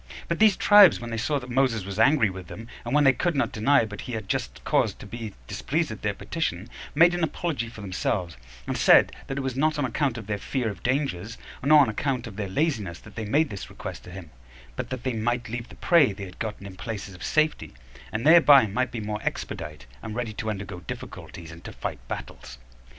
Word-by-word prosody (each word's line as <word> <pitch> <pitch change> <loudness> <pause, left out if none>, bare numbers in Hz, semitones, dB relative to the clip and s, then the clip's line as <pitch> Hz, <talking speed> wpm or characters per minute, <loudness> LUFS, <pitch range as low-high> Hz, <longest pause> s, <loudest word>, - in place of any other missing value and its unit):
But 170 - -2
these 215 -3 +5
tribes, 205 -4 +7
when 120 0 -7
they 115 - -2
saw 145 +6 0
that 125 -2 -7
Moses 120 -6 +1
was 100 +1 -5
angry 115 -3 +4
with 95 -2 -9
them, 115 +6 -9 0.2
and 120 +4 -2
when 150 - +5
they 135 -1 +6
could 175 +4 -1
not 140 - +1
deny 125 +4 +3
but 105 -2 -8
he 125 - -7
had 110 -1 -3
a - - -20
just - - -3
cause - - +1
to - - -12
be 110 0 -7
displeased 160 - -1
at 110 - -8
their 105 -1 -1
petition, 115 - -3 0.3
made 170 +3 +6
an 175 -1 -1
apology 150 -6 -2
for 115 -2 -11
themselves; 90 -2 -2 0.3
and - - -2
said, - - +6 0.2
that 135 - -4
it - - -1
was 130 -2 -3
not 155 +3 +1
on 145 - 0
account 130 0 -1
of 110 - -7
their 105 0 -3
fear 125 -1 -2
of 100 - -8
dangers, 120 -6 -1 0.3
nor 150 +2 +7
on 135 - +4
account 125 +3 -2
of 110 -4 -9
their 100 -2 -4
laziness, 105 - -1
that 105 +4 -15
they 110 -1 -4
made 145 +7 +2
this 100 -3 -7
request - - -8
to - - -10
him, 90 -4 -10 0.4
but - - -4
that 130 -2 -5
they 130 - -1
might 120 +2 -1
leave 120 +1 -5
the - - -12
prey 160 -10 +4
they 100 0 -7
had 90 -1 -13
gotten 105 -3 -5
in 95 -2 -9
places 105 -2 -6
of 90 - -11
safety, 155 - 0 0.4
and 110 +4 -3
thereby 150 -5 +8
might 125 +5 -1
be 115 - -4
more 105 0 -4
expedite, 75 -3 -5 0.2
and 110 - -6
ready 115 -2 -3
to 110 +1 -4
undergo 100 -3 -5
difficulties, 85 0 -8
and 85 +1 -12
to - - -8
fight - - -5
battles. 65 - -7
115 Hz, 235 wpm, -26 LUFS, 100-140 Hz, 0.4 s, thereby